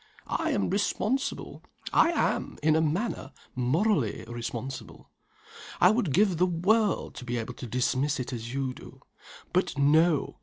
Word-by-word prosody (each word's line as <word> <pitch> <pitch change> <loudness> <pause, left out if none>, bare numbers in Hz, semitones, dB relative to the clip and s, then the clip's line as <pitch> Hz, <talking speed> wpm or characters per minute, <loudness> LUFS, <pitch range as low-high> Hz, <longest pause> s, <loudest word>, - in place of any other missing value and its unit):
I - - -1
am 100 - 0
responsible 215 +6 -1 0.3
I - - +5
am, - - -1
in 155 0 +4
a 160 - +3
manner, 160 - -2 0.2
morally 130 - +1
responsible. 120 -3 -6 0.7
I 180 - +7
would 215 - 0
give 190 +3 +3
the 180 +2 +3
world 200 +5 +1
to - - -7
be 120 0 -3
able 115 - -4
to 125 - -8
dismiss 130 +5 0
it 125 +1 -4
as 115 -1 -5
you 135 -1 -2
do. - - -13 0.5
But - - +1
no! 155 +2 +3
150 Hz, 150 wpm, -28 LUFS, 125-185 Hz, 0.7 s, I